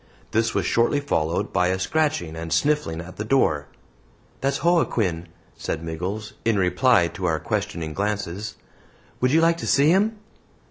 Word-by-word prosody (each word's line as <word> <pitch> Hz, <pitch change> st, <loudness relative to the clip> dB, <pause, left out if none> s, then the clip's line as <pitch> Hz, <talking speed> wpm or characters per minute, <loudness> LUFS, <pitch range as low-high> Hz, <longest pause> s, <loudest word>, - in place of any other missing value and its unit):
This 115 Hz, +1 st, +1 dB
was -, -, +1 dB
shortly 120 Hz, +5 st, +2 dB
followed 85 Hz, -, -1 dB
by 90 Hz, -, +3 dB
a 95 Hz, +1 st, +1 dB
scratching 120 Hz, -, 0 dB
and 80 Hz, 0 st, -6 dB
sniffling 85 Hz, -, +1 dB
at 90 Hz, +2 st, -11 dB
the 105 Hz, -, -3 dB
door. 80 Hz, -, +2 dB, 0.7 s
"That's 135 Hz, +1 st, -1 dB
Joaquin," 110 Hz, -, +1 dB, 0.3 s
said 80 Hz, -, -4 dB
Miggles, 90 Hz, +7 st, -4 dB
in 115 Hz, -2 st, +2 dB
reply 95 Hz, +1 st, +3 dB
to 95 Hz, -, -5 dB
our 80 Hz, -3 st, +1 dB
questioning 80 Hz, +1 st, -3 dB
glances; 105 Hz, +1 st, -3 dB, 0.6 s
"would 125 Hz, 0 st, +2 dB
you 160 Hz, +3 st, +4 dB
like 165 Hz, 0 st, +3 dB
to -, -, -5 dB
see 140 Hz, +2 st, +4 dB
him?" 210 Hz, +4 st, +2 dB
105 Hz, 155 wpm, -24 LUFS, 85-140 Hz, 0.7 s, you